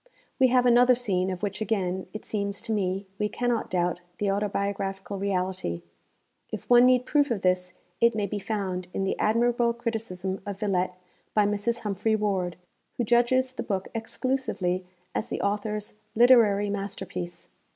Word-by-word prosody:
We 260 - +7
have 250 0 +3
another 245 +1 +6
scene 190 -6 0
of 185 +1 -5
which 200 +1 -2
again, 190 -4 -1
it 215 - -8
seems 200 -1 -2
to - - -3
me, 195 -2 0
we 210 0 +1
cannot 245 -1 -1
doubt 175 -1 0 0.2
the 205 -1 +1
autobiographical 200 -1 -2
reality. 185 - -2 0.7
If - - -6
one 245 0 +7
need 250 -1 +4
proof 290 -1 +2
of 220 -5 -2
this, 185 0 +1 0.3
it 235 -1 +4
may 210 -2 0
be 205 +1 -3
found 190 -3 -3
in 195 - 0
the 195 - 0
admirable 235 +1 +2
criticism 220 -5 -4
of 200 -1 -6
Villette 185 -3 0 0.4
by 210 -1 +5
Mrs. 210 +3 0
Humphry 215 +1 0
Ward, 195 -5 -1 0.4
who 245 - +1
judges 240 +3 +3
the - - -4
book 195 -2 -2
exclusively 225 -6 -2 0.3
as - - -2
the - - -3
author's 210 +1 -2 0.2
literary 220 -4 +5
masterpiece. 180 -3 -5
205 Hz, 160 wpm, -27 LUFS, 190-235 Hz, 0.7 s, We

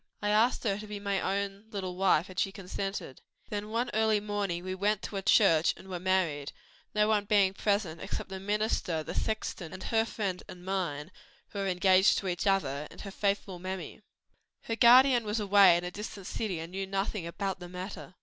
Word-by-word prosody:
"I 205 - -1
asked 225 +4 +3
her 200 -3 0
to 215 - -8
be 210 -1 -6
my 200 -1 -1
own 200 +1 -2
little 190 -4 -4
wife 185 -2 +3
and 185 0 -6
she 195 - +1
consented. 195 - -5 0.3
Then 205 0 -3 0.3
early 220 -1 +3
one 205 - -12
morning 200 -4 -2
we 185 0 -3
went 205 +2 0
to - - -6
a - - -2
church 180 -5 +4
and - - -13
were 180 -1 -4
married; 170 -6 0 0.4
no 210 0 +4
one 210 -2 +2
being 200 -2 +3
present 200 -5 -1
except 195 - -5
the 190 0 -6
minister, 205 -5 -1
the - - -6
sexton, 215 -6 -3
and 185 - -8
her 225 -1 +2
friend 200 -5 -3
and 180 0 -11
mine, 180 -5 -2 0.4
who 200 - -6
were 195 - -1
engaged 185 +1 +4
to 195 - -3
each 180 +2 -1
other, 150 -7 +1
and - - -12
her 200 - -7
faithful 195 -2 -1
mammy. 185 +1 -6 0.6
"Her 225 - -2
guardian 245 +1 +7
was 210 +1 -2
away 200 -4 +6
in 175 - -4
a 180 - -4
distant 205 -1 -7
city 200 -3 -3
and 165 +2 -7
knew 195 +1 -4
nothing 195 -2 -2
about 190 +2 -3
the 175 -1 -9
matter. 185 0 -8
195 Hz, 205 wpm, -30 LUFS, 180-210 Hz, 0.6 s, guardian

